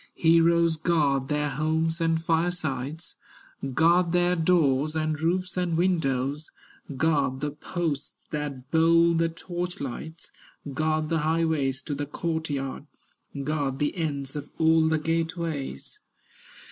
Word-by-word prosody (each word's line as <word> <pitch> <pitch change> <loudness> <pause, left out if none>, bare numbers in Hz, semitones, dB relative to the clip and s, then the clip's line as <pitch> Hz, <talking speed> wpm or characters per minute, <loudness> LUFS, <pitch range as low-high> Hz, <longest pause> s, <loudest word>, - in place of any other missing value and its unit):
Heroes 165 0 +4
guard 145 -5 +1
their 150 0 0
homes 160 +3 0
and 165 0 +2
firesides, 160 -3 -2 0.6
Guard 170 +1 +4
their 175 0 +3
doors, 155 -4 +2
and 155 -1 -1
roofs, 185 +3 0
and 175 -2 0
windows, 150 -5 0 0.5
Guard 140 -3 +1
the 150 +1 -2
posts 150 -1 -4
that 145 -4 -4
hold 165 +1 +4
the 165 0 +2
torch 175 +1 -5
lights, 150 +5 -7 0.4
Guard 155 +1 0
the 165 -1 +1
highways 155 -4 0
to 145 - -4
the 145 0 -3
court 160 +1 -3
yard, 135 0 -4 0.6
Guard 140 -2 -1
the 145 +4 -1
ends 140 -5 -3
of 145 - -6
all 160 0 +4
the 160 0 +2
gate 165 +2 -1
ways. 145 - -5
160 Hz, 130 wpm, -26 LUFS, 145-165 Hz, 0.6 s, Heroes